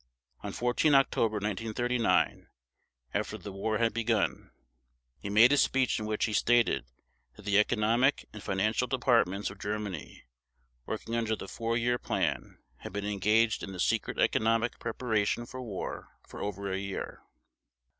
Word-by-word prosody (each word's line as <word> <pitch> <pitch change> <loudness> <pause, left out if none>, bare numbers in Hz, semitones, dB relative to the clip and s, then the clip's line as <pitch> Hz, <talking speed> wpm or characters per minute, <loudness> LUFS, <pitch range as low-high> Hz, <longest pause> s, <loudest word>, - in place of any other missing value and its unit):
On - - -5
14 125 +5 +2
October 115 -5 +3
1939, 115 +4 0 0.7
after - - -2
the 100 - -8
war 110 +3 -1
had 115 0 +1
begun, 115 -2 0 0.7
he 100 - -6
made 110 +5 +6
a 145 - +4
speech 130 -3 +2
in 105 - -4
which 110 0 0
he 110 - -3
stated 115 - +3 0.5
that 105 - -14
the 100 0 +4
economic 115 +5 +2
and 105 - -8
financial 110 +6 0
departments 115 -7 +1
of 100 - -13
Germany 100 -9 -5 0.6
working 110 +1 -4
under 115 -1 0
the 100 - -8
Four 115 +2 -2
Year 120 +1 +1
Plan - - -2 0.2
had - - -9
been 100 0 -3
engaged 105 +2 +2
in 95 - -6
the 90 - -8
secret - - 0
economic 115 +1 +1
preparation 115 -1 -1
for 130 +2 -8
war 105 -7 -6
for - - -9
over 100 -1 -3
a 95 - -1
year. 100 0 -5
110 Hz, 150 wpm, -30 LUFS, 100-120 Hz, 0.7 s, made